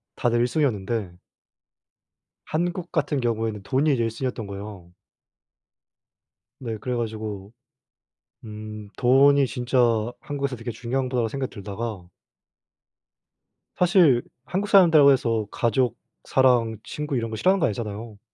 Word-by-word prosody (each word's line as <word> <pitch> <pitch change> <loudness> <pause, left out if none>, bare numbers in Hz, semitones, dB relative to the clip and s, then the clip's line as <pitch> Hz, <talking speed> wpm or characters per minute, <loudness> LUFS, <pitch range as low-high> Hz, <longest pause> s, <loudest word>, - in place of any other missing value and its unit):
다들 120 -1 +1
1 120 - +3
순위였는데 115 - -1 1.3
한국 175 +2 -2
같은 150 -4 0
경우에는 110 -3 -2
돈이 140 +8 +2
이제 120 -3 +1
1 115 - -1
순위이었던 115 -2 -4
거에요. 100 -3 -9 1.7
네. 115 -3 -4
그래 125 +4 -3
가지고 110 -3 -5 0.9
음 105 -1 -8
돈이 140 +2 +5
진짜 125 +3 -2 0.4
한국에서 140 -2 -3
되게 115 +1 -7
중요한 125 +3 -2
거라고 120 -3 0
생각 130 +3 -4
들다가 100 -3 -6 1.7
사실 170 -9 +5 0.2
한국 195 +8 -2
사람들이라고 160 -7 +7
해서 115 -5 +1
가족, 120 0 0 0.3
사랑, 120 -4 +2
친구 150 -2 -4
이런 115 -1 -2
거 110 - -5
싫어하는 190 - +3
거 - - +2
아니잖아요. 105 -1 -5
120 Hz, 280 characters per minute, -24 LUFS, 110-135 Hz, 1.7 s, 사람들이라고